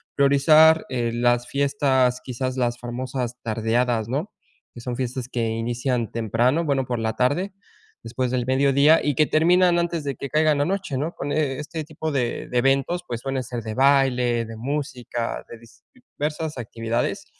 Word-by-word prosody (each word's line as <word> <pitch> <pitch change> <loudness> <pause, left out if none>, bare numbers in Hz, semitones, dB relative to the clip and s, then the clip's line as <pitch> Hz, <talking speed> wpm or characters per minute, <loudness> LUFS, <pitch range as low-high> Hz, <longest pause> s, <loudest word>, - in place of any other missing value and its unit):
priorizar, 155 +3 +5
eh, 120 -3 -1
las 120 0 +1
fiestas, 135 -3 +1
quizás 130 0 -4
las 120 -1 -1
famosas 125 0 -4
tardeadas, 115 0 0
¿no? 150 - -2 0.4
Que 120 - -10
son 125 0 -4
fiestas 125 -1 -4
que 120 -3 -1
inician 120 +1 -2
temprano, 120 - +1
bueno, 140 -3 +1
por 120 -1 -3
la 110 0 -1
tarde, 175 +10 0 0.5
después 125 +2 -2
del 125 -1 -1
mediodía 140 +4 +4
y 145 -2 0
que 155 - +4
terminan 175 +2 +4
antes 170 -2 -1
de 140 -2 -3
que 140 - -6
caiga 155 +1 +3
la 145 0 +1
noche, 190 -6 -2
¿no? 155 +6 -2
Con 145 - -5
este 150 +2 -2
tipo 155 0 -5
de 125 -4 -2
de 125 - -1
eventos, 135 +7 +1
pues, 120 -1 -4
suelen 135 -1 -2
ser 120 -1 -6
de 110 -1 -5
baile, 125 -3 +3
de 115 0 -9
música, 125 -2 -4
de 120 - -10 0.6
diversas 150 0 -3
actividades 115 0 -3
130 Hz, 165 wpm, -23 LUFS, 120-145 Hz, 0.6 s, priorizar